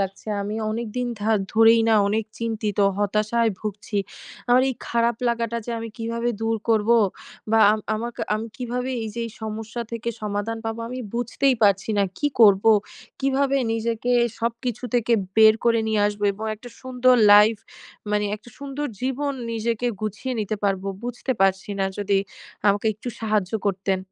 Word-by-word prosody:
লাগছে। 195 +2 -4
আমি 205 +1 -4 0.2
অনেকদিন 235 +2 -3
ধা 215 - 0 0.2
ধরেই 225 +1 +6
না 225 - +5
অনেক 215 +1 0
চিন্তিত, 220 -3 -3 0.2
হতাশায় 215 +3 +1
ভুগছি। 210 0 -4 0.5
আমার 250 +1 +5
এই - - -4
খারাপ 235 -1 +1
লাগাটা 235 -1 -1
যে - - -4
আমি 230 0 -5
কীভাবে 230 +1 -2
দূর 225 0 0
করবো 225 +1 +4 0.5
বা 225 - +4
আম 215 - -1
আমাক 235 +2 -4 0.2
আমি 220 +1 -3
কীভাবে 250 0 -3
এইযে 220 +2 -5
এই - - -8
সমস্যা 220 +2 -4
থেকে 230 0 -3
সমাধান 210 +2 -2
পাবো 225 +1 -3
আমি 255 +1 -5 0.2
বুঝতেই 245 +3 +1
পারছি 200 0 +3
না; - - +4 0.2
কি - - +1
করবো? 205 0 +7 0.5
কিভাবে 275 0 +1 0.2
নিজেকে 230 +1 -2 0.3
সবকিছু 235 +1 -3
থেকে 240 -1 +2 0.2
বের 220 0 +8
করে 230 -1 +3
নিয়ে 215 -1 +1
আসবো? 205 0 -2
এবং 210 +3 -7
একটা 230 +3 -12
সুন্দর 255 -1 +3 0.2
লাইফ 210 +2 +7 0.5
মানে, 210 0 +1
একটা 220 +3 -17
সুন্দর 280 +1 -4
জীবন 265 +3 -1 0.2
নিজেকে 230 +1 -1
গুছিয়ে 215 +5 -3
নিতে 215 +1 -2
পারবো 195 -1 0 0.2
বুঝতে 245 +2 -3
পারছি 195 +1 +2
না। 195 - +1
যদি 200 -1 +1 0.5
আমাকে 205 +2 +1
একটু 220 +4 -8
সাহায্য 215 -3 0
করতেন। 190 0 0
225 Hz, 160 wpm, -23 LUFS, 210-235 Hz, 0.5 s, বের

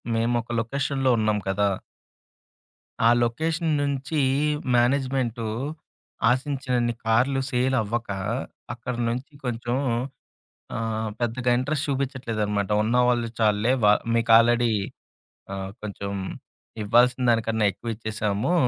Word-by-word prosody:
మేముక 115 +1 0
లొకేషన్‌లో 135 +2 0
ఉన్నాం 110 -1 +2
కదా! 100 +1 +2 1.4
ఆ - - +8
లొకేషన్ 160 +7 0
నుంచి, 140 +2 -1 0.5
మేనేజ్మెంటు 125 -2 +1 0.8
ఆశించినన్ని 130 -2 0
కార్లు 125 +5 +3
సేల్ 130 +1 +1
అవ్వక, 115 +1 -3 0.6
అక్కడి 120 0 -5
నుంచి 125 +6 -4
కొంచెం 120 0 -2 1.0
ఆహ్‌, 110 -1 -2
పెద్దగా 120 +1 0
ఇంట్రెస్ట్ 145 +4 -1
చూపిచ్చట్లేదనమాట 115 -7 -1
ఉన్నవాళ్ళు 120 +1 +2
చాలులే. 110 +2 +3
వ - - +7 0.3
మీకు 115 0 +1
ఆల్రెడీ 120 0 +3 0.8
ఆహ్, 95 0 -5
కొంచెం 100 -1 -5 0.7
ఇవ్వాల్సిన 125 +4 +4
దానికన్నా 115 -1 +2
ఎక్కువిచ్చేసాము, 110 - -2
120 Hz, 95 wpm, -25 LUFS, 110-130 Hz, 1.4 s, ఆ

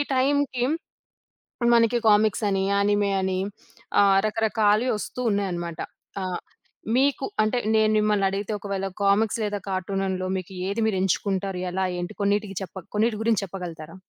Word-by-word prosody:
టైంకి 265 -1 +1 1.1
మనకి 230 +1 +3
కామిక్సని, 205 -2 +2
యానిమే 205 0 +2
అని 190 0 0 0.6
ఆహ్, 195 -1 +5
రకరకాలవి 220 +1 +2
ఒస్తూ 250 - -6
ఉన్నాయనమాట. 175 -4 -2 0.4
ఆ! - - -2 0.7
మీకు 275 0 +2 0.2
అంటే 215 +3 +1 0.2
నేను 215 0 +4
మిమ్మల్ని 210 -2 +2
అడిగితే 200 +2 -3
ఒకవేళ 195 -1 -3 0.2
కామిక్స్ 205 +3 +3
లేదా 205 -1 -1
కార్టూనన్‌లో 190 0 -2
మీకు 185 0 -6 0.2
ఏది 200 +3 -1
మీరెంచుకుంటారు? 190 -1 0
ఎలా 190 +1 -1
ఏంటి? 175 +3 -4
కొన్నిటికి 200 -1 0
చెప్ప 190 - -9 0.2
కొన్నిటి 215 0 +2
గురించి 225 -2 +2
చెప్పగలుగుతారా? 170 -4 -7
200 Hz, 125 wpm, -25 LUFS, 190-220 Hz, 1.1 s, ఆహ్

